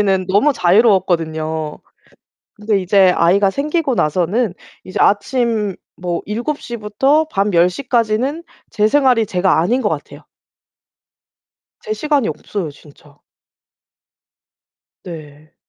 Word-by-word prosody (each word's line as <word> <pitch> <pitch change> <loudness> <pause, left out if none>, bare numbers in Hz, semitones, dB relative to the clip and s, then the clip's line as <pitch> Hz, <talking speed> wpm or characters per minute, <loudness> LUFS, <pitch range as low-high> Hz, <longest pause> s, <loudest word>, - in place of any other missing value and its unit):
그때까지는 190 -3 +1
너무 210 +10 +3
자유로웠거든요. 170 - +1 0.8
근데 210 -1 0
이제 190 0 +4
아이가 195 +4 +3
생기고 290 - -1
나서는 185 +6 0 0.3
이제 185 - -6
아침 210 -1 +1 0.2
뭐 175 -1 -3
7:00 240 +3 -4
부터 265 +9 +1
밤 200 0 0
10:00 180 +10 +1
까지는 245 +7 0 0.3
제 210 0 +2
생활이 255 -5 +3
제가 180 -3 +1
아닌 240 +10 +1
것 - - 0
같아요. - - -6 1.6
제 435 -2 -4
시간이 295 - 0
없어요 160 +2 -5
진짜. 145 0 -19 1.9
네. 155 -2 -11
200 Hz, 230 characters per minute, -17 LUFS, 175-240 Hz, 1.9 s, 이제